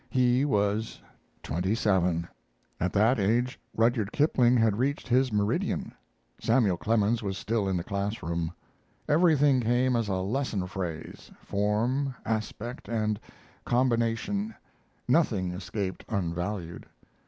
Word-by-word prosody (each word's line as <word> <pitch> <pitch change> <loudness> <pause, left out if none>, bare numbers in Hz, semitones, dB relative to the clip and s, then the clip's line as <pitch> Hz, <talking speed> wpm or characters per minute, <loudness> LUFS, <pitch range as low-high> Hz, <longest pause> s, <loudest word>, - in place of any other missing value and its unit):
He 125 +1 +3
was 105 -3 0 0.4
twenty 95 +6 -1
seven. 90 -6 +1 0.5
At 90 +2 0
that 110 +4 +3
age 120 +5 +1 0.2
Rudyard 115 -2 +2
Kipling 125 -5 +3
had 110 -2 +2
reached 140 +3 -1
his 130 0 +3
meridian. 105 -1 -1 0.5
Samuel 115 -6 +3
Clemens 110 +4 +1
was 95 -2 -3
still 110 -3 -1
in 95 - 0
the 85 - -2
classroom. 95 -5 -2 0.6
Everything 145 -4 +4
came 120 +2 +2
as 115 -2 0
a 95 - 0
lesson 100 +1 -1
phrase, 90 -4 -6
form, 120 +7 0
aspect, 115 +2 -4
and 110 -2 0 0.4
combination; 125 - 0 0.5
nothing 100 - +2
escaped 95 +1 -4
unvalued. 90 -3 -3
110 Hz, 115 wpm, -28 LUFS, 95-125 Hz, 0.6 s, Everything